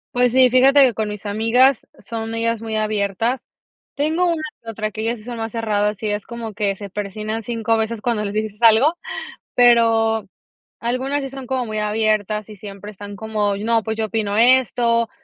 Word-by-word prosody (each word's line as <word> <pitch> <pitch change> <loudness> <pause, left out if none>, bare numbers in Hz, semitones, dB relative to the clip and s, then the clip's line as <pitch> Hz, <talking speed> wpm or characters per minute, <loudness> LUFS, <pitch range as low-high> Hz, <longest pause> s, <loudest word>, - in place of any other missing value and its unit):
Pues 245 -1 +3
sí, 255 -1 +5
fíjate 270 +3 +6
que 250 -3 +3
con 215 0 -2
mis 210 0 -7
amigas 230 +5 +3
son 225 0 -5
ellas 230 0 -1
muy 225 -1 -4
abiertas. 215 +3 -1 0.5
Tengo 320 +5 +1
una 330 -2 -1 0.2
que 230 - -9
otra, 215 -1 -3
que 215 - -6
ellas 230 +2 -1
sí 215 - -15
son 240 -1 -6
más 225 0 -4
cerradas, 210 -2 -1
y 215 - 0
es 205 0 -3
como 235 -2 -6
que 200 -1 -1
se 200 0 -9
persignan 210 +2 -4
5 225 0 -1
veces 220 0 -2
cuando 220 -2 -1
les 200 - -4
dices 215 0 -3
algo, 230 +8 +6 0.6
pero 225 -3 +4 0.5
algunas 260 +4 -1
sí 270 - -5
son 270 -1 -8
como 255 0 -2
muy 215 -1 -3
abiertas, 215 -1 0
y 210 - -9
siempre 200 0 -9
están 205 0 -9
como: 210 -2 -1
“No, 225 +2 +1
pues 220 0 -3
yo 220 - 0
opino 210 -1 -2
esto”, 235 -1 +3
225 Hz, 195 wpm, -20 LUFS, 210-240 Hz, 0.6 s, fíjate